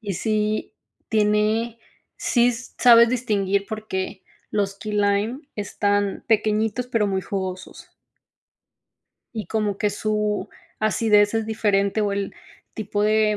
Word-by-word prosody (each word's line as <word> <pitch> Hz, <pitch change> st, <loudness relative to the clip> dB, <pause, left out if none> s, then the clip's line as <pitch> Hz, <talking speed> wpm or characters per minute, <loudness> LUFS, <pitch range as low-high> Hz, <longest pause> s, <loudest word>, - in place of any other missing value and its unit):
Y 205 Hz, -4 st, -4 dB
sí, 215 Hz, +1 st, -1 dB, 0.3 s
tiene 215 Hz, +2 st, +1 dB, 0.4 s
sí 245 Hz, 0 st, +2 dB
sabes 235 Hz, -1 st, +5 dB
distinguir, 200 Hz, -5 st, 0 dB
porque 200 Hz, -3 st, -4 dB, 0.3 s
los 200 Hz, -1 st, -1 dB
key 215 Hz, -1 st, -5 dB
lime 205 Hz, +5 st, +1 dB, 0.2 s
están 205 Hz, -1 st, -1 dB
pequeñitos, 220 Hz, +2 st, +1 dB
pero 230 Hz, -4 st, +1 dB
muy 190 Hz, -1 st, -1 dB
jugosos, 185 Hz, -1 st, -5 dB, 1.4 s
Y 220 Hz, -2 st, -4 dB
como 210 Hz, -3 st, -1 dB
que 210 Hz, -, +1 dB
su 210 Hz, 0 st, -1 dB, 0.3 s
acidez 210 Hz, -1 st, +3 dB
es 225 Hz, 0 st, +1 dB
diferente 210 Hz, -2 st, +1 dB
o 205 Hz, -1 st, +1 dB
el 200 Hz, 0 st, -2 dB, 0.4 s
tipo 205 Hz, -1 st, -2 dB
de, 215 Hz, 0 st, +3 dB
210 Hz, 115 wpm, -23 LUFS, 200-220 Hz, 1.4 s, sabes